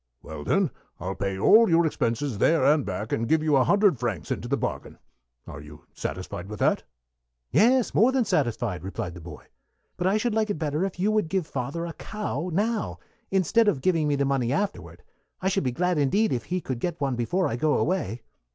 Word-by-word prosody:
"Well, 80 -2 -8
then, - - +1 0.3
I'll 95 +3 -3
pay 95 -1 -3
all 220 - +6
your 170 0 +4
expenses 125 -4 -1
there 160 0 +3
and 145 +1 +4
back, 100 +1 -4
and 115 +1 -1
give 160 -1 +3
you 155 -2 +3
a 130 - +5
hundred 200 - +3
francs 105 -12 -3
into - - -3
the - - 0
bargain. - - -4 0.5
Are 75 - -9
you 75 0 -13
satisfied 90 0 -5
with 105 - -6
that?" - - +2 0.7
"Yes, 245 +3 +3
more 230 +6 +4
than 260 -3 +1
satisfied," 120 - -1
replied 90 -2 -5
the 90 - -10
boy. 80 -2 -11 0.5
"But 180 - 0
I 195 +3 +3
should 235 +1 -1
like 220 0 +1
it 205 - -1
better 155 +1 -1
if 190 -2 -6
you 205 +4 +2
would 215 -6 +1
give 190 -2 0
father 140 +4 -4
a 170 - -6
cow 210 -3 -4
now, 215 +5 -1 0.3
instead 195 +4 +2
of 155 -10 +1
giving 165 -3 +2
me 145 - +2
the 140 0 +1
money 135 -3 0
afterward. 200 +6 -3 0.4
I 190 - 0
should 195 -2 0
be 130 - 0
glad 180 +4 0
indeed 200 +11 +2
if 120 - -3
he 180 0 -2
could 130 -6 -4
get 175 +4 -3
one 135 -3 0
before 175 +11 0
I 115 - -2
go 150 +5 +1
away." 125 - -1
155 Hz, 215 wpm, -26 LUFS, 115-190 Hz, 0.7 s, all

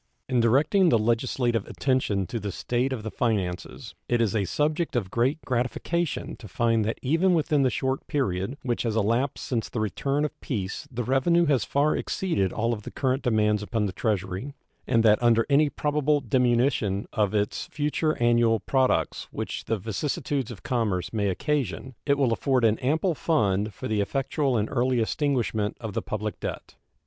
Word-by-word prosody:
In 125 -2 +1
directing 145 - +4
the 120 - +4
legislative 115 0 0
attention 125 -8 0
to 115 - -4
the 100 -1 -4
state 125 +7 -1
of 120 -5 -3
the 110 - -4
finances 100 -7 -2 0.2
it 120 - +2
is 115 -3 +1
a 100 -3 +1
subject 150 - -1
of 100 -6 -1
great 130 +6 +1
gratification 130 +5 -1
to 110 - -11
find 115 +3 +1
that 110 - -2
even 165 +7 +3
within 150 -2 +2
the 130 - +3
short 130 +2 -2
period 125 - -1
which 120 -2 -1
has 115 -3 -1
elapsed 115 +6 0
since 115 -4 -2
the 120 - -4
return 135 +8 0
of 150 - -7
peace 100 -6 -4
the 120 0 -3
revenue 135 +8 +3
has 140 -8 +2
far 145 +2 +2
exceeded 100 - -1
all 115 +1 0
the 105 - -8
current 130 0 -1
demands 105 -4 +2
upon 105 0 -1
the 95 - -3
Treasury, 105 +5 -2 0.3
and 115 -2 +3
that 110 0 +5
under 115 -1 +4
any 145 +1 +5
probable 150 0 +1
diminution 120 -5 +1
of 105 -1 +1
its 105 -1 -1
future 150 +1 -1
annual 120 -1 +3
products 130 +5 0
which - - -5
the 115 - 0
vicissitudes 130 +5 -2
of 120 - -9
commerce 110 -9 -1
may 100 -2 +1
occasion 130 +3 -2
it 140 0 +3
will 130 -5 +2
afford 130 +1 +1
an 110 0 +3
ample 160 +7 +1
fund 105 - +1
for 95 - -6
the 105 -1 +1
effectual 135 +3 0
and 105 0 0
early 125 +1 +1
extinguishment 115 -4 0
of 110 -3 -6
the - - -1
public 105 0 -4
debt. - - -6
120 Hz, 175 wpm, -26 LUFS, 110-140 Hz, 0.3 s, that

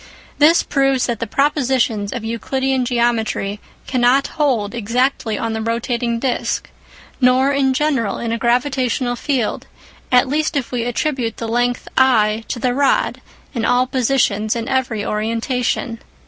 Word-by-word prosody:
This 315 +3 +5
proves 270 -2 +1
that 235 -3 -2
the 230 - -3
propositions 255 -6 +1
of 245 - -5
Euclidean 260 +3 -1
geometry 230 -4 0 0.3
cannot 255 +2 +2
hold 250 -9 0
exactly 235 0 0
on 225 +1 -2
the 220 - -3
rotating 235 +1 -1
disc, 255 +1 -2 0.5
nor 260 +1 +4
in 275 -1 +2
general 265 -8 0
in 235 -1 -3
a 230 - 0
gravitational 250 0 0
field, 245 -2 -2 0.4
at 250 0 +5
least 305 +2 0
if 270 - -3
we 240 -2 -1
attribute 245 -2 -2
the 230 - -4
length 245 +2 0
I 225 -4 +3
to - - -3
the 245 +1 0
rod 275 +1 +1 0.3
in 235 -4 -2
all 250 +1 +3
positions 240 -5 +1
and 230 0 -3
in 270 - -1
every 245 -5 -1
orientation. 230 +2 -1
245 Hz, 145 wpm, -19 LUFS, 230-265 Hz, 0.5 s, This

